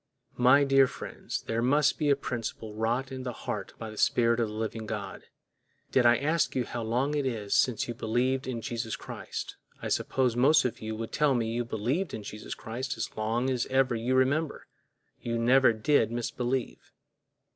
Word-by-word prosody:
My 130 +3 +6
dear 135 -1 +5
friends, - - -6
there 115 +1 -1
must 145 +4 +3
be 150 -2 +1
a 140 - +5
principle 115 -4 -5
wrought 120 +5 -1
in 130 -1 -5
the 125 -1 -3
heart - - -4
by 110 -1 -6
the 110 - -9
Spirit 115 0 +3
of 115 - +1
the 105 - -7
living 110 0 -4
God. 100 -2 -5 0.7
Did 125 -2 +4
I 120 0 +6
ask 155 +3 0
you 125 -2 0
how 120 - -5
long 125 +6 0
it 145 -2 0
is 105 -5 -3
since 125 -4 +2
you 120 - -3
believed 125 +4 0
in 120 -3 -3
Jesus 115 -4 -3
Christ, - - -7 0.2
I - - -4
suppose 125 -3 +1
most 140 +4 +5
of 125 - -2
you 110 0 -4
would 115 0 -5
tell 150 -3 +2
me 115 -2 0
you 120 +1 -1
believed 120 - -2
in 110 - -7
Jesus 105 +1 -7
Christ 120 +3 -5
as 110 - -4
long 115 +4 0
as 125 -2 -1
ever 130 -1 +2
you 120 +3 0
remember—you 130 -3 -2
never 125 +2 +5
did 115 +1 +2
misbelieve. 120 +1 -3
120 Hz, 190 wpm, -29 LUFS, 115-130 Hz, 0.7 s, My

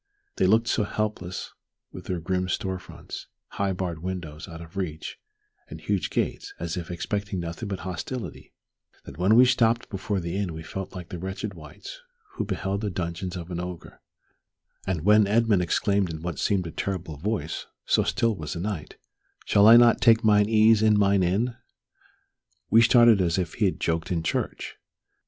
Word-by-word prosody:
They - - +3
looked 115 +1 +3
so 115 - +1
hopeless 100 -4 -4 0.4
with - - -10
their 90 -2 -2
grim 90 +2 -1
stone 95 +1 -2
fronts, - - -10 0.2
high 100 -1 -1
barred 90 -3 -4
windows 85 -4 -6
out 80 -2 -9
of 85 +1 -12
reach, 80 -5 -5 0.5
and - - -8
huge - - -1
gates, 400 0 -2
as - - -3
if 85 -3 -5
expecting 100 +3 -3
nothing 85 +5 -5
but 95 - -4
hostility, 100 +7 -6 0.5
that - - -11
when 95 +5 +4
we 125 +2 +8
stopped 120 -2 +2
before 100 0 -2
the 85 0 -4
inn 95 -4 -2
we 80 - -7
felt 95 +4 -6
like 90 -2 -8
the 90 - -6
wretched 95 +3 -5
wights 85 - -11 0.3
who 375 - -3
beheld 100 0 -2
the 105 - -1
dungeons 90 0 -4
of 85 +1 -7
an 85 - -3
ogre; 90 -1 -8 0.9
and 90 -4 -1
when 105 0 +6
Edmund 110 -2 +3
exclaimed 100 +2 +1
in 80 -1 -6
what 85 -4 -4
seemed 95 -3 +1
a 85 - -5
terrible 90 -6 -4
voice, 90 -2 -3 0.2
so - - +3
still 115 -2 +1
was 75 -3 -5
the 85 - -5
night, 95 -4 -5 0.5
"Shall 100 +1 +5
I 115 +1 +10
not 120 -1 +5
take 115 -2 +5
mine 105 -1 +4
ease 110 0 +5
in 110 -1 +4
mine 100 -1 +3
inn?" 105 +7 0 1.2
we 115 +2 +7
started 120 -3 +6
as 85 -1 +1
if 90 -2 -2
he 110 - 0
had 95 - 0
joked 80 +1 -1
in 85 -2 0
church. - - -3
95 Hz, 185 wpm, -26 LUFS, 85-110 Hz, 1.2 s, I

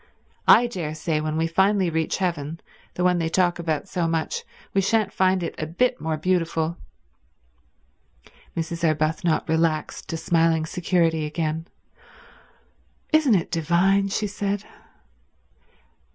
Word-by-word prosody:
I 245 - +8
daresay 160 -7 -2
when 155 0 -2
we 165 - +1
finally 190 +2 +2
reach 160 0 -1
heaven—the 165 0 -4
one 180 -1 +3
they 165 -1 0
talk 175 0 +1
about 160 +1 -2
so 175 -3 -1
much—we 165 +4 -3
shan't 210 0 +1
find 185 -1 +2
it - - -3
a 155 - -2
bit 245 +10 0
more 160 0 -1
beautiful." 165 -1 0 1.8
Mrs. 165 +1 -3
Arbuthnot 155 +1 +1
relaxed 160 -1 -1
to 165 - -2
smiling 165 -1 +2
security 165 -2 +1
again. 160 +1 -3 1.5
"Isn't 300 -8 +5
it 170 - -1
divine?" 180 +5 +2
she 205 +2 -1
said. 205 0 -2
170 Hz, 120 wpm, -24 LUFS, 160-190 Hz, 1.8 s, I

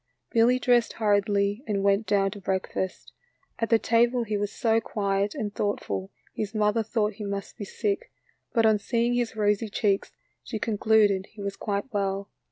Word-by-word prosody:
Billy 235 +2 +4
dressed 245 -2 +2
hurriedly 205 +1 +1
and 200 -2 0
went 200 +2 +2
down 195 -1 +2
to 205 - -9
breakfast. 190 0 -3 0.5
At 230 - 0
the 230 - +6
table 235 +2 +2
he 215 -2 -2
was 205 0 -1
so 225 -2 +1
quiet 200 -1 -1
and 205 -1 -3
thoughtful 100 - -2 0.2
his 215 0 -4
mother 215 +1 +2
thought 220 -1 0
he 210 +1 -8
must 200 -1 -4
be 205 - -6
sick, 420 - -2 0.4
but 230 -2 +3
on 215 -1 +4
seeing 235 +3 0
his 240 -2 -1
rosy 210 +1 +1
cheeks 200 -1 0 0.3
she 225 - -4
concluded 210 -2 +2
he 210 - -10
was 200 0 -3
quite 205 +4 -3
well. 195 -1 -2
210 Hz, 175 wpm, -26 LUFS, 200-225 Hz, 0.5 s, the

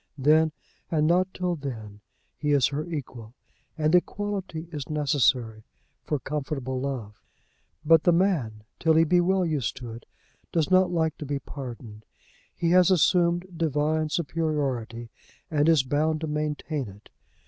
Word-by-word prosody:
Then, 155 +3 +4 0.4
and 155 -2 +1
not 180 +3 +2
till 180 -1 -2
then, 110 -8 -7 0.3
he 150 -1 0
is 135 -4 +4
her 150 +4 -4
equal; 125 -8 -7 0.4
and 155 0 +1
equality 185 -3 -1
is 145 -4 -6
necessary 130 -7 +1 0.4
for 150 - -1
comfortable 135 -1 -3
love. 125 -7 -5 0.6
But 165 0 +6
the 175 - +4
man, 160 - +1 0.2
till 160 -1 +3
he 160 - +6
be 175 +2 +3
well 185 +1 +2
used 150 -10 -2
to 120 -2 -7
it, 115 +1 -11 0.4
does 165 +1 0
not 185 -1 +5
like 160 -2 0
to 150 - -5
be 145 0 -1
pardoned. 120 -6 -9 0.5
He 170 -1 0
has 180 0 +6
assumed 175 -1 +3
divine 155 -1 0
superiority, 140 -8 -2 0.4
and 150 0 +3
is 160 -5 +5
bound 155 +3 0
to 160 - -2
maintain 150 -2 -2
it. 100 +1 -14
150 Hz, 150 wpm, -26 LUFS, 130-165 Hz, 0.6 s, But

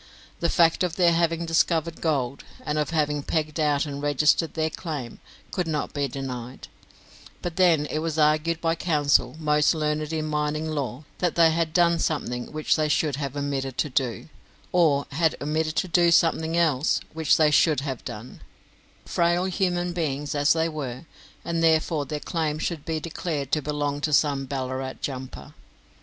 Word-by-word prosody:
The 170 - 0
fact 165 -1 +3
of 180 -2 0
their 175 -2 +4
having 165 0 +1
discovered 165 0 +1
gold, 140 -5 -1 0.2
and 150 0 -1
of 150 - -1
having 150 -2 0
pegged 155 +1 -2
out 150 -1 +2
and 140 -1 -6
registered 150 +3 +2
their 160 -1 0
claim, 150 -10 -6 0.3
could 180 -3 -2
not 150 -2 -2
be 145 -1 -1
denied; 125 -2 -7 0.7
but 175 -2 -4
then 170 -5 +4
it 155 - -3
was 160 0 -3
argued 155 +2 +2
by 165 -1 +1
counsel 150 -4 +2
most 150 0 +2
learned 150 0 -1
in 155 -1 -2
mining 150 +1 -1
law 145 -3 -3 0.2
that 175 -2 0
they 165 -1 +5
had 165 0 0
done 170 0 +3
something 125 -6 -2
which 155 0 +1
they 155 -1 +1
should 150 -2 +1
have 140 -1 -4
omitted 135 -2 -3
to 150 - -1
do, 125 +3 -1 0.4
or 155 -6 +3
had 160 +2 +1
omitted 155 +2 -1
to 185 - 0
do 175 0 +4
something 165 -1 +2
else 155 -4 +2
which 160 -2 +3
they 155 -2 +4
should 150 -2 +4
have 135 -4 -5
done, 110 +4 -8 0.6
frail 175 +1 +1
human 180 -2 -1
beings 150 -4 -2
as 145 0 +3
they 165 0 +1
were, 145 -3 -5 0.4
and 170 -1 -1
therefore 160 -2 +2
their 150 +2 -3
claim 155 -1 -2
should 155 -1 -3
be 160 -1 -2
declared 155 -4 -4
to 155 - +2
belong 145 0 -2
to 155 - -1
some 140 -2 +2
Ballarat 130 -1 -3
jumper. 130 - -6
155 Hz, 175 wpm, -25 LUFS, 145-165 Hz, 0.7 s, they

